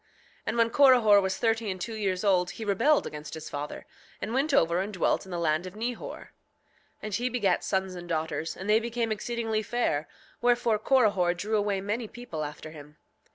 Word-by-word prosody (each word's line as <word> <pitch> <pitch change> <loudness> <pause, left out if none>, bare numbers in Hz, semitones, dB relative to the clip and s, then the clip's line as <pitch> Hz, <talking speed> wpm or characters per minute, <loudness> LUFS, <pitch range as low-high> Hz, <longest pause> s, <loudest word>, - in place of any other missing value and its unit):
7:4 - - -37 0.4
And 225 - -1
when 230 0 +4
Corihor 245 -7 +6
was 190 0 -1
thirty 225 -1 0
and 185 -1 -4
two 225 +5 -4
years 195 -4 -1
old 180 -3 +3
he 220 - -5
rebelled 230 +10 +3
against 150 +1 -7
his 160 0 -8
father, 145 +1 -5 0.3
and 220 - -4
went 275 +4 +1
over 170 -10 +3
and 195 +3 -2
dwelt 190 -1 0
in 190 - -11
the 175 - -3
land 165 +1 0
of 185 - -10
Nehor; 235 +2 -5 0.7
and 215 -1 -5
he 245 +5 0
begat 205 -7 +1
sons 190 -1 -1
and 175 -1 -9
daughters, 160 0 -2
and 190 - -7
they 215 +1 +5
became 230 0 -2
exceedingly 225 0 -2
fair; 200 -10 -1 0.3
wherefore 240 -2 +2
Corihor 205 -8 +3
drew 210 +5 -2
away 205 -2 0
many 215 +4 -2
people 210 -10 -6
after 150 +1 -7
him. 150 -1 -13
205 Hz, 200 wpm, -28 LUFS, 175-230 Hz, 0.7 s, Corihor